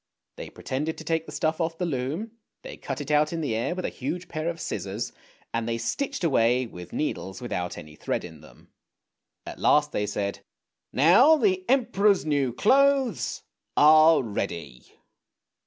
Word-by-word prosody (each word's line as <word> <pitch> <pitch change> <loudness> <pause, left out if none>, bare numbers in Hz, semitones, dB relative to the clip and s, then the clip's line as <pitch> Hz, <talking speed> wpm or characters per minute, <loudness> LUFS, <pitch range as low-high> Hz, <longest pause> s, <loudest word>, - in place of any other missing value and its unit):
They - - -8
pretended 150 +5 -4
to - - -8
take 160 0 -1
the - - -8
stuff 160 +1 -1
off 165 0 -2
the 180 - -1
loom. 155 - -3 0.3
They - - -8
cut - - -5
it 145 +1 -5
out 150 +1 +3
in 165 -1 -3
the 140 -8 -1
air 115 +10 -1
with 185 - -4
a - - -1
huge 165 +7 -5
pair 155 +1 -2
of 170 -1 -5
scissors, 110 +2 -4 0.4
and 115 0 -1
they 115 - -1
stitched 280 - -3
away 125 -5 +3
with 90 -6 -10
needles 95 -9 -3
without 90 -8 -4
any 75 -1 -11
thread - - -3
in 80 -3 -11
them. 75 - -18 0.8
At - - -8
last - - +3
they 105 - -1
said: 100 0 -3 0.3
" - - -60
Now 255 - +7
the 375 +2 +1
Emperor's 210 - +3
new 140 -4 +1
clothes 270 - +2 0.3
are 155 0 +7
ready! 85 - -5
155 Hz, 170 wpm, -26 LUFS, 115-180 Hz, 0.8 s, Now